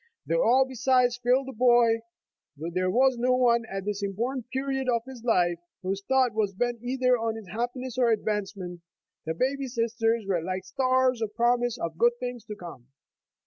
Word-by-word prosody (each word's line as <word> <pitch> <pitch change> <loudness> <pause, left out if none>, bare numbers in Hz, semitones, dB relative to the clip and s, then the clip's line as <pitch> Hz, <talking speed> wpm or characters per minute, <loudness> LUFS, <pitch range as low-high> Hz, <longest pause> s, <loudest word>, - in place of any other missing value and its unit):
Though - - +1
all 265 - +4
beside 255 -1 +2
failed 255 +2 +2
the 265 - -6
boy, 240 -1 +4 0.6
though 165 +4 -5
there 185 +1 +1
was 255 +5 +3
no 250 +1 +2
one 235 -2 +3
at 195 0 -5
this 205 0 -3
important 235 +6 -3
period 270 0 -2
of 235 -2 +1
his 260 -3 -10
life 175 -7 +2 0.2
whose 195 +1 -2
thought 260 -1 +2
was 205 -3 -1
bent 240 +2 -1
either 250 0 +1
on 225 -1 -1
his 220 -5 -9
happiness 245 +4 -4
or 245 -2 +4
advance 210 -2 -1
ment, 175 -2 -7 0.5
the 160 - -1
baby 270 +6 -1
sisters 230 -2 0
were 180 -4 +1
like 185 +2 -3
stars 255 0 +1
of 215 -1 -3
promise 240 0 +2
of 165 -5 -5
good 240 0 +5
things 245 -2 -5
to 210 - -7
come. 170 - -11
235 Hz, 185 wpm, -27 LUFS, 205-255 Hz, 0.6 s, good